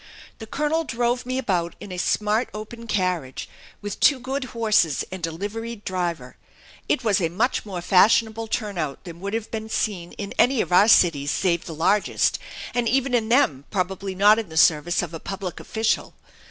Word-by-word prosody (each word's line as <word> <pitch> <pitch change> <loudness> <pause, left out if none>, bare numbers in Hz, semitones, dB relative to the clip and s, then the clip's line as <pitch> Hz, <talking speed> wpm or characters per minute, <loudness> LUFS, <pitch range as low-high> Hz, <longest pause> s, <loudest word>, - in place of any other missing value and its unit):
The 220 - -8
colonel 300 +6 0
drove 245 -2 -1
me 255 0 -1
about 175 -9 -1
in 200 - -9
a 180 - -5
smart 215 +5 +1
open 230 +2 -8
carriage, 180 - -2 0.4
with 205 -1 -5
two 280 -3 +5
good 265 +2 -3
horses 215 - +1
and 185 -3 -3
a - - -5
liveried 210 +5 -6
driver. 170 -8 -3 0.5
It 255 - +1
was 205 -4 +2
a 165 - +1
much 215 +6 -1
more 180 -3 -5
fashionable 220 +4 +3
turnout 195 - -3
than 170 -2 -10
would 200 +2 -5 0.2
be 220 -1 -4
seen 180 -6 -2
in 200 -1 -6
any 255 0 +4
of - - -1
our 190 +4 +6
cities 155 -9 +4
save 170 +1 0
the 165 -4 -7
largest, 195 +6 +1 0.3
and 240 -2 +1
even 270 0 +1
in 225 -2 +1
them 155 - +2
probably 190 0 -3
not 205 +3 +5
in 220 -6 -5
the 160 - -7
service 160 +2 +3
of 170 -1 -6
a 165 - -5
public 190 -1 -6
official. 220 0 -1
205 Hz, 180 wpm, -23 LUFS, 175-230 Hz, 0.5 s, our